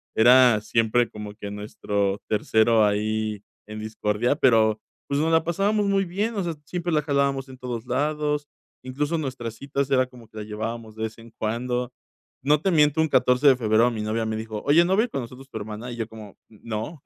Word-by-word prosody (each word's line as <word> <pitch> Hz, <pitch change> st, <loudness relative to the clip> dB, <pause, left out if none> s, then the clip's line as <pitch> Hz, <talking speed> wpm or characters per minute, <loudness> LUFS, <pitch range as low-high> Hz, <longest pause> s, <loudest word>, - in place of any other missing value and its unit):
Era 120 Hz, -1 st, +6 dB
siempre 115 Hz, +2 st, +1 dB
como 105 Hz, -1 st, -8 dB
que 100 Hz, -2 st, -7 dB
nuestro 105 Hz, -1 st, -2 dB
tercero 110 Hz, +1 st, +3 dB
ahí 105 Hz, 0 st, -1 dB, 0.3 s
en 105 Hz, 0 st, -7 dB
discordia, 110 Hz, +4 st, -1 dB
pero, 110 Hz, -5 st, +4 dB, 0.3 s
pues, 140 Hz, +1 st, 0 dB
nos 160 Hz, +1 st, +1 dB
la 160 Hz, 0 st, +4 dB
pasábamos 200 Hz, +4 st, +1 dB
muy 195 Hz, -1 st, +2 dB
bien, 205 Hz, +6 st, -2 dB
o 195 Hz, -, -1 dB
sea, 170 Hz, -1 st, -2 dB
siempre 175 Hz, +1 st, -3 dB
la 150 Hz, -, +3 dB
jalábamos 140 Hz, -2 st, 0 dB
en 130 Hz, -, -11 dB
todos 125 Hz, -2 st, -5 dB
lados, 150 Hz, +2 st, -1 dB, 0.4 s
incluso 145 Hz, +5 st, -2 dB
nuestras 130 Hz, -6 st, -4 dB
citas 140 Hz, +1 st, -3 dB
era 130 Hz, -1 st, +4 dB
como 120 Hz, -3 st, -15 dB
que 110 Hz, -, -14 dB
la 105 Hz, -, -4 dB
llevábamos 110 Hz, +1 st, -5 dB
de 110 Hz, -, -5 dB
vez 110 Hz, +1 st, -4 dB
en 115 Hz, 0 st, -13 dB
cuando. 125 Hz, +3 st, -2 dB, 0.5 s
No 150 Hz, +2 st, +3 dB
te 195 Hz, -, +1 dB
miento 150 Hz, -1 st, +4 dB
un 160 Hz, -, +2 dB
14 125 Hz, +2 st, +3 dB
de 135 Hz, -, +8 dB
febrero, 115 Hz, +1 st, +3 dB
mi 110 Hz, -2 st, -4 dB
novia 110 Hz, +1 st, -1 dB
me 110 Hz, 0 st, -2 dB
dijo: 110 Hz, -1 st, -5 dB
"Oye, 165 Hz, +4 st, +6 dB
¿no 190 Hz, +2 st, +2 dB
va 215 Hz, -, +4 dB
a -, -, +2 dB
ir -, -, -10 dB
con 135 Hz, -, -3 dB
nosotros 130 Hz, +3 st, -11 dB
tu 110 Hz, -, -6 dB
hermana?". 110 Hz, +3 st, -6 dB
Y -, -, -6 dB
yo: 115 Hz, -1 st, -3 dB
"¿Cómo?, 110 Hz, -3 st, -12 dB
no, 115 Hz, +7 st, -6 dB
120 Hz, 210 wpm, -24 LUFS, 110-145 Hz, 0.5 s, de